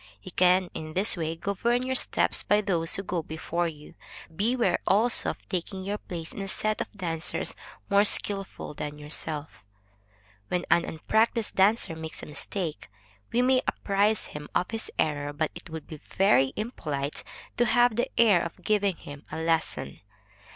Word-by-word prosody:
You -, -, -8 dB
can 180 Hz, +1 st, +4 dB
in 155 Hz, 0 st, -6 dB
this 195 Hz, +4 st, +5 dB
way 165 Hz, -2 st, -2 dB
govern 230 Hz, +8 st, 0 dB
your 260 Hz, 0 st, -1 dB
steps -, -, +2 dB
by 210 Hz, +1 st, +3 dB
those 175 Hz, -5 st, 0 dB
who 195 Hz, -, -2 dB
go 180 Hz, -2 st, -1 dB
before 160 Hz, +2 st, -2 dB
you. 150 Hz, -2 st, -9 dB, 0.4 s
Beware 235 Hz, +6 st, +2 dB
also 225 Hz, +5 st, +3 dB
of -, -, -7 dB
taking 190 Hz, +1 st, -3 dB
your 205 Hz, +2 st, -2 dB
place 165 Hz, -2 st, -7 dB
in -, -, -6 dB
a 195 Hz, -, -3 dB
set 215 Hz, +2 st, -1 dB
of -, -, -4 dB
dancers 170 Hz, -2 st, -3 dB, 0.3 s
more 200 Hz, 0 st, +5 dB
skilful 200 Hz, -5 st, -2 dB
than 150 Hz, 0 st, -5 dB
yourself. 150 Hz, 0 st, -6 dB, 0.8 s
When 180 Hz, +7 st, -1 dB
an 170 Hz, -, +5 dB
unpractised 220 Hz, +7 st, +1 dB
dancer 195 Hz, -3 st, +3 dB
makes 160 Hz, 0 st, -7 dB
a -, -, -4 dB
mistake, 155 Hz, -, -4 dB, 0.4 s
we 245 Hz, -, +3 dB
may 255 Hz, 0 st, +4 dB
apprise 205 Hz, +2 st, +2 dB
him 150 Hz, 0 st, -7 dB
of 180 Hz, -, +1 dB
his 225 Hz, -1 st, -3 dB
error; 145 Hz, -1 st, 0 dB
but 155 Hz, +1 st, -1 dB
it 175 Hz, 0 st, -10 dB
would 160 Hz, -2 st, -6 dB
be 155 Hz, -, -8 dB
very 135 Hz, -6 st, +3 dB
impolite 150 Hz, -, -3 dB, 0.3 s
to 240 Hz, -, +4 dB
have 240 Hz, 0 st, +4 dB
the 240 Hz, -, 0 dB
air 210 Hz, -7 st, +6 dB
of 170 Hz, -, -6 dB
giving 205 Hz, -3 st, +2 dB
him 145 Hz, -2 st, -10 dB
a -, -, -4 dB
lesson. 160 Hz, -, -1 dB
180 Hz, 170 wpm, -28 LUFS, 160-210 Hz, 0.8 s, air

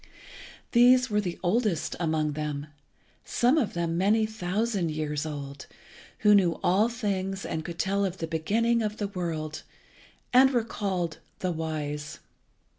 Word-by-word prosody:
These 250 Hz, 0 st, +5 dB
were 210 Hz, 0 st, +2 dB
the 180 Hz, -4 st, -4 dB
oldest 200 Hz, -3 st, +1 dB
among 155 Hz, -3 st, 0 dB
them, 150 Hz, -1 st, -3 dB, 0.6 s
some 245 Hz, +4 st, +2 dB
of 225 Hz, -11 st, -1 dB
them 170 Hz, 0 st, -1 dB
many 215 Hz, +4 st, +3 dB
thousand 210 Hz, -2 st, -1 dB
years 150 Hz, -1 st, -2 dB
old, 140 Hz, -2 st, -7 dB, 0.6 s
who 210 Hz, -, +8 dB
knew 185 Hz, -5 st, +3 dB
all 200 Hz, +6 st, +3 dB
things 195 Hz, -4 st, -2 dB
and 160 Hz, -1 st, -3 dB
could 170 Hz, +1 st, -7 dB
tell 200 Hz, +3 st, +1 dB
of 190 Hz, -1 st, -2 dB
the 165 Hz, -, -3 dB
beginning 220 Hz, +9 st, +1 dB
of 215 Hz, -1 st, -2 dB
the 205 Hz, -1 st, -2 dB
world, 160 Hz, -5 st, -4 dB, 0.7 s
and 260 Hz, +2 st, +7 dB
were 245 Hz, -4 st, +1 dB
called 185 Hz, -7 st, -3 dB, 0.2 s
the 185 Hz, -, 0 dB
Wise. 150 Hz, -2 st, -4 dB
185 Hz, 145 wpm, -27 LUFS, 160-215 Hz, 0.7 s, who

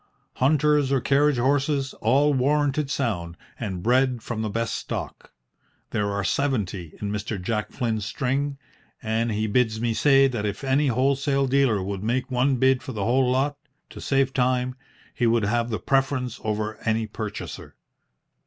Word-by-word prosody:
Hunters 145 Hz, 0 st, +3 dB
or 135 Hz, -, +3 dB
carriage 140 Hz, +2 st, +2 dB
horses, 135 Hz, +2 st, +1 dB
all 140 Hz, +6 st, +3 dB
warranted 145 Hz, +1 st, +1 dB
sound, 90 Hz, -12 st, -2 dB, 0.2 s
and 95 Hz, -6 st, -4 dB
bred 125 Hz, 0 st, +2 dB
from 110 Hz, -2 st, -4 dB
the 110 Hz, -, -2 dB
best 115 Hz, +1 st, -2 dB
stock. -, -, -6 dB, 0.6 s
There 105 Hz, -1 st, 0 dB
are 100 Hz, 0 st, -2 dB
seventy 100 Hz, -, -1 dB
in 100 Hz, -1 st, -3 dB
Mr. 105 Hz, 0 st, -3 dB
Jack 105 Hz, +3 st, -2 dB
Flynn's 115 Hz, -4 st, -2 dB
string, 135 Hz, +6 st, -2 dB, 0.5 s
and 115 Hz, +1 st, 0 dB
he 110 Hz, +1 st, -1 dB
bids 110 Hz, 0 st, +1 dB
me 115 Hz, 0 st, 0 dB
say 135 Hz, +2 st, +5 dB
that 120 Hz, -5 st, -3 dB
if 105 Hz, +4 st, -3 dB
any 135 Hz, +2 st, +2 dB
wholesale 135 Hz, +2 st, +1 dB
dealer 130 Hz, -7 st, +2 dB
would 100 Hz, 0 st, -4 dB
make 125 Hz, +5 st, -1 dB
one 130 Hz, +2 st, +2 dB
bid 130 Hz, +1 st, +3 dB
for 130 Hz, -, -7 dB
the 105 Hz, -3 st, -3 dB
whole 125 Hz, +2 st, +3 dB
lot, 135 Hz, +3 st, +1 dB, 0.3 s
to -, -, -9 dB
save 135 Hz, -1 st, +1 dB
time, 125 Hz, 0 st, +1 dB, 0.4 s
he 120 Hz, -, +1 dB
would 115 Hz, -2 st, +2 dB
have 120 Hz, +3 st, 0 dB
the 110 Hz, -, -1 dB
preference 130 Hz, +2 st, 0 dB
over 110 Hz, 0 st, -2 dB
any 110 Hz, 0 st, +1 dB
purchaser." 105 Hz, -1 st, -7 dB
125 Hz, 160 wpm, -24 LUFS, 110-135 Hz, 0.6 s, say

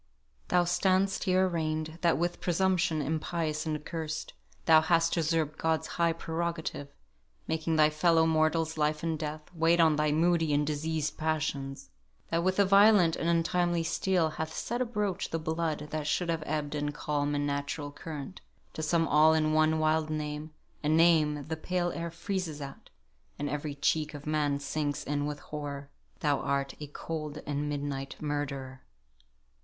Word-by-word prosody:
"Thou 180 Hz, 0 st, +3 dB
stand'st 190 Hz, +3 st, +1 dB
here 185 Hz, 0 st, +3 dB
arraign'd, 155 Hz, -1 st, -2 dB
That, 170 Hz, -1 st, +3 dB
with 175 Hz, +1 st, -2 dB
presumption 175 Hz, -3 st, +1 dB
impious 160 Hz, 0 st, -2 dB
and 155 Hz, -, 0 dB
accursed, 155 Hz, 0 st, -5 dB, 0.3 s
Thou 160 Hz, -3 st, +7 dB
hast 165 Hz, 0 st, +2 dB
usurp'd 160 Hz, -2 st, 0 dB
God's 160 Hz, -1 st, +1 dB
high 170 Hz, -1 st, +1 dB
prerogative, 165 Hz, -3 st, -3 dB, 0.6 s
Making 160 Hz, 0 st, 0 dB
thy 155 Hz, -1 st, +5 dB
fellow 165 Hz, +1 st, +3 dB
mortal's 160 Hz, 0 st, +1 dB
life 150 Hz, +1 st, +1 dB
and 165 Hz, -1 st, 0 dB
death 155 Hz, 0 st, -4 dB
Wait 165 Hz, +1 st, +3 dB
on 160 Hz, -2 st, +5 dB
thy 150 Hz, 0 st, +2 dB
moody 165 Hz, -1 st, +2 dB
and 145 Hz, +1 st, +2 dB
diseased 155 Hz, 0 st, -2 dB
passions; 140 Hz, -3 st, -2 dB, 0.4 s
That 165 Hz, +1 st, +1 dB
with 185 Hz, +1 st, +1 dB
a 200 Hz, -, +5 dB
violent 195 Hz, -3 st, +6 dB
and 165 Hz, -, -1 dB
untimely 170 Hz, 0 st, +1 dB
steel 165 Hz, 0 st, +1 dB
Hast 160 Hz, 0 st, -5 dB
set 240 Hz, +2 st, -2 dB
abroach 210 Hz, -6 st, -1 dB
the 165 Hz, -, -1 dB
blood 160 Hz, -2 st, -2 dB
that 155 Hz, -1 st, -3 dB
should 175 Hz, +3 st, 0 dB
have 165 Hz, -1 st, 0 dB
ebbed 150 Hz, -1 st, -2 dB
In 145 Hz, 0 st, -1 dB
calm 145 Hz, 0 st, -1 dB
and 145 Hz, 0 st, 0 dB
natural 145 Hz, +1 st, -3 dB
current: 150 Hz, +3 st, -8 dB, 0.3 s
to -, -, -5 dB
sum 165 Hz, +1 st, +2 dB
all 155 Hz, +2 st, +5 dB
In 155 Hz, -1 st, +2 dB
one 155 Hz, 0 st, +3 dB
wild 155 Hz, 0 st, +1 dB
name 150 Hz, 0 st, -3 dB, 0.3 s
a 150 Hz, -, +1 dB
name 155 Hz, -3 st, +4 dB
the 160 Hz, -, -2 dB
pale 175 Hz, +2 st, -1 dB
air 170 Hz, 0 st, -4 dB
freezes 170 Hz, -2 st, -4 dB
at, 140 Hz, -1 st, -9 dB, 0.5 s
And 145 Hz, -, -2 dB
every 145 Hz, 0 st, -3 dB
cheek 150 Hz, +1 st, 0 dB
of 145 Hz, -, -9 dB
man 150 Hz, -2 st, +1 dB
sinks 145 Hz, 0 st, -2 dB
in 145 Hz, 0 st, -1 dB
with 150 Hz, -1 st, -4 dB
horror 145 Hz, -1 st, -6 dB, 0.3 s
Thou 145 Hz, -2 st, +2 dB
art 140 Hz, 0 st, -1 dB
a 150 Hz, -, -6 dB
cold 155 Hz, 0 st, -6 dB
and 145 Hz, 0 st, -2 dB
midnight 140 Hz, -2 st, -3 dB
murderer." 140 Hz, -3 st, -4 dB
155 Hz, 165 wpm, -30 LUFS, 150-165 Hz, 0.6 s, Thou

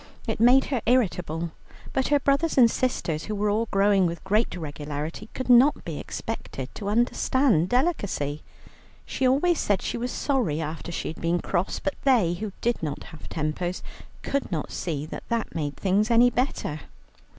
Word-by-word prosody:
It 225 Hz, -4 st, -2 dB
made 250 Hz, +4 st, +6 dB
her 245 Hz, -, 0 dB
irritable, 175 Hz, -9 st, +1 dB, 0.4 s
but 265 Hz, -, +1 dB
her 290 Hz, 0 st, +3 dB
brothers 280 Hz, +4 st, +1 dB
and 235 Hz, -3 st, +7 dB
sisters, 170 Hz, -, -1 dB
who 215 Hz, -, -3 dB
were 205 Hz, 0 st, +1 dB
all 225 Hz, +2 st, 0 dB
growing 195 Hz, -2 st, +3 dB
with 170 Hz, 0 st, -5 dB
great 210 Hz, +3 st, +1 dB
regularity, 150 Hz, +4 st, -5 dB
could 260 Hz, -, -4 dB
not 255 Hz, +4 st, +5 dB
be 160 Hz, -3 st, -4 dB
expected 135 Hz, -, -6 dB
to 200 Hz, -, -6 dB
understand 235 Hz, -, +2 dB
delicacy. 200 Hz, -, 0 dB, 0.6 s
She 260 Hz, -, 0 dB
always 310 Hz, +7 st, +3 dB
said 205 Hz, -2 st, +1 dB
she -, -, -2 dB
was 245 Hz, +1 st, -2 dB
sorry 245 Hz, -, 0 dB
after 160 Hz, +2 st, -5 dB
she -, -, -3 dB
had 160 Hz, -, -8 dB
been 170 Hz, +1 st, +1 dB
cross, 175 Hz, +2 st, -1 dB
but 290 Hz, -, -2 dB
they, 230 Hz, -11 st, +4 dB
who 205 Hz, +3 st, -4 dB
did 240 Hz, 0 st, 0 dB
not 150 Hz, -3 st, -4 dB
have 160 Hz, -, -11 dB
tempers, 165 Hz, +3 st, -3 dB, 0.4 s
could 280 Hz, -6 st, -2 dB
not 155 Hz, -4 st, -3 dB
see 150 Hz, -4 st, -3 dB
that -, -, -8 dB
that 235 Hz, -1 st, -1 dB
made 145 Hz, -3 st, -3 dB
things 200 Hz, +3 st, +1 dB
any 240 Hz, +1 st, +5 dB
better. 245 Hz, -, -2 dB
205 Hz, 175 wpm, -26 LUFS, 165-250 Hz, 0.6 s, and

